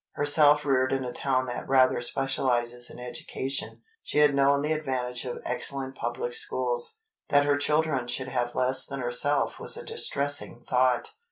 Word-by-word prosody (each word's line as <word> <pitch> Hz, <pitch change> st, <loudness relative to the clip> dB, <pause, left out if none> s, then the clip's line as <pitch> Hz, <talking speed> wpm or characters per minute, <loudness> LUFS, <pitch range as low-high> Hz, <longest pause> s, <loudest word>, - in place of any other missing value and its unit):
Herself 145 Hz, 0 st, +4 dB
reared 130 Hz, -2 st, +2 dB
in 135 Hz, -1 st, -1 dB
a 125 Hz, -, -5 dB
town 130 Hz, -2 st, 0 dB
that 120 Hz, 0 st, -6 dB
rather 130 Hz, -2 st, +4 dB
specializes 120 Hz, -2 st, 0 dB
in -, -, -10 dB
education, 125 Hz, +2 st, -5 dB, 0.2 s
she -, -, -5 dB
had 150 Hz, -1 st, +5 dB
known 140 Hz, +1 st, +3 dB
the 150 Hz, +2 st, 0 dB
advantage 130 Hz, -5 st, -3 dB
of 125 Hz, -, -4 dB
excellent 135 Hz, -1 st, -2 dB
public 475 Hz, -, -4 dB
schools. 455 Hz, +1 st, -1 dB, 0.3 s
That 145 Hz, -1 st, +4 dB
her 145 Hz, 0 st, +3 dB
children 150 Hz, -4 st, +1 dB
should 130 Hz, +1 st, -3 dB
have 120 Hz, -2 st, -2 dB
less 130 Hz, +1 st, +2 dB
than 140 Hz, 0 st, -5 dB
herself 125 Hz, +4 st, 0 dB
was -, -, -2 dB
a 475 Hz, -, -8 dB
distressing 145 Hz, -, -2 dB
thought. 125 Hz, -, +1 dB
135 Hz, 165 wpm, -27 LUFS, 125-145 Hz, 0.3 s, had